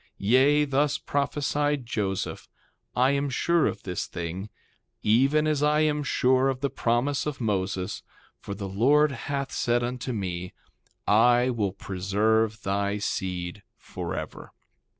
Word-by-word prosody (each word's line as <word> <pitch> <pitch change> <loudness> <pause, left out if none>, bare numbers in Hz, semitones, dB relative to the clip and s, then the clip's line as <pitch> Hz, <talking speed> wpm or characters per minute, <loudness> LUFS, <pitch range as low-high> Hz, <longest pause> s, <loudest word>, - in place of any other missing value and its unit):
3:16 - - -32
Yea, 135 +8 +4
thus 140 +1 +1
prophesied 145 -1 -1
Joseph: 100 -4 -3 0.5
I 130 +2 +4
am 140 0 0
sure 170 +5 +2
of - - -4
this 90 -2 -3
thing, 90 +4 -5 0.5
even 135 +8 +3
as 155 -2 +1
I 150 +1 +3
am 150 -1 +1
sure 130 -1 +2
of 130 -1 -3
the 140 -2 -1
promise 130 +4 0
of 150 - -4
Moses; 95 -4 -2 0.4
for 100 - -6
the 100 0 -5
Lord 140 +10 +3
hath 140 +1 -4
said 120 0 +1
unto 125 +1 -3
me, 90 -5 -4 0.5
I 120 +4 +4
will 105 -5 -1
preserve 105 +3 0
thy 100 +1 0
seed 90 -1 -3 0.2
forever. - - -6
120 Hz, 135 wpm, -26 LUFS, 100-140 Hz, 0.5 s, Yea